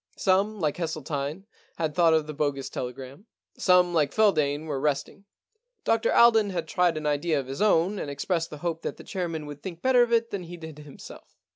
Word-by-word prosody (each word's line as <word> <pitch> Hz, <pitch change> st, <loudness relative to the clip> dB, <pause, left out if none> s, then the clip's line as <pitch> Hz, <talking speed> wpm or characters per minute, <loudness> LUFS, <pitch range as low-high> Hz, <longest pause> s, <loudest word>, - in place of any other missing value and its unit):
Some,. 200 Hz, +3 st, +1 dB
like 155 Hz, -4 st, -1 dB
Hesseltine, 155 Hz, 0 st, -4 dB, 0.3 s
had 160 Hz, -2 st, -2 dB
thought 165 Hz, -1 st, +4 dB
of 155 Hz, -1 st, +1 dB
the 155 Hz, -, -6 dB
bogus 140 Hz, -2 st, -2 dB
telegram. 130 Hz, -, -7 dB, 0.3 s
Some, 180 Hz, -1 st, +4 dB
like 150 Hz, -4 st, +2 dB
Feldane, 155 Hz, -9 st, +2 dB
were 145 Hz, -4 st, -3 dB
resting. 145 Hz, +7 st, -2 dB, 0.6 s
Dr 225 Hz, 0 st, +1 dB
Alden 225 Hz, -3 st, +5 dB
had 185 Hz, -, -3 dB
tried 175 Hz, -3 st, +1 dB
an 155 Hz, -, -5 dB
idea 150 Hz, +1 st, +1 dB
of 135 Hz, -, -5 dB
his 135 Hz, +6 st, -6 dB
own, 195 Hz, -1 st, +2 dB
and -, -, -4 dB
expressed 165 Hz, +4 st, -2 dB
the 150 Hz, -, -8 dB
hope 165 Hz, -1 st, -2 dB
that -, -, -5 dB
the -, -, -11 dB
chair 185 Hz, -3 st, -3 dB
man 160 Hz, -2 st, -5 dB
would 145 Hz, -1 st, -9 dB
think 170 Hz, -3 st, -8 dB
better 255 Hz, -1 st, +5 dB
of 240 Hz, -1 st, +2 dB
it 230 Hz, 0 st, +2 dB
than 195 Hz, -3 st, -4 dB
he 175 Hz, +1 st, -9 dB
did 160 Hz, -2 st, -10 dB
himself. 145 Hz, -2 st, -13 dB
165 Hz, 210 wpm, -26 LUFS, 145-190 Hz, 0.6 s, Alden